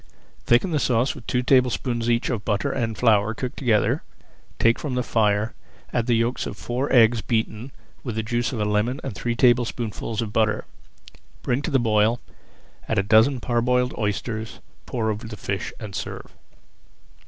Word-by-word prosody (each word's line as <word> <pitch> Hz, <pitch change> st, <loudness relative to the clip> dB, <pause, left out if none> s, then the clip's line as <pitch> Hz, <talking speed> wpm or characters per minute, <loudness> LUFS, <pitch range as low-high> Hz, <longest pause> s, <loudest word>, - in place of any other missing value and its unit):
Thicken 120 Hz, +10 st, +3 dB
the 150 Hz, -, +1 dB
sauce 125 Hz, 0 st, +1 dB
with -, -, -13 dB
two 125 Hz, 0 st, 0 dB
tablespoonfuls 125 Hz, -2 st, +2 dB
each 120 Hz, +2 st, +1 dB
of 110 Hz, -4 st, -3 dB
butter 105 Hz, +8 st, 0 dB
and 115 Hz, -5 st, -2 dB
flour 110 Hz, -2 st, +3 dB
cooked 125 Hz, +3 st, -5 dB
together, 115 Hz, -6 st, +2 dB, 0.6 s
take 115 Hz, 0 st, +3 dB
from 140 Hz, -5 st, -3 dB
the 125 Hz, -, 0 dB
fire, 105 Hz, -2 st, +1 dB, 0.4 s
add 120 Hz, -1 st, 0 dB
the 120 Hz, -, +3 dB
yolks 115 Hz, +3 st, 0 dB
of -, -, -7 dB
four 125 Hz, +4 st, -3 dB
eggs 115 Hz, -1 st, +5 dB
beaten 115 Hz, +2 st, -2 dB, 0.3 s
with 120 Hz, -5 st, -4 dB
the 110 Hz, -, -1 dB
juice 120 Hz, +1 st, -1 dB
of 120 Hz, -, -4 dB
a 105 Hz, -, +1 dB
lemon 105 Hz, +6 st, 0 dB
and 135 Hz, -, -4 dB
three 120 Hz, +3 st, -2 dB
tablespoonfuls 120 Hz, -2 st, +1 dB
of 105 Hz, -1 st, -6 dB
butter. 110 Hz, -1 st, +1 dB, 0.8 s
Bring 125 Hz, +2 st, 0 dB
to 150 Hz, -, -3 dB
the 140 Hz, -, +3 dB
boil, 110 Hz, 0 st, +2 dB, 0.7 s
add -, -, 0 dB
a 100 Hz, -, +3 dB
dozen 110 Hz, +6 st, +4 dB
parboiled 125 Hz, +1 st, +1 dB
oysters, 110 Hz, +1 st, -3 dB, 0.3 s
pour 110 Hz, -3 st, -1 dB
over 110 Hz, +2 st, -5 dB
the 110 Hz, -1 st, -8 dB
fish, 100 Hz, -2 st, -3 dB
and 105 Hz, -3 st, -7 dB
serve. -, -, -6 dB
115 Hz, 175 wpm, -24 LUFS, 110-125 Hz, 0.8 s, eggs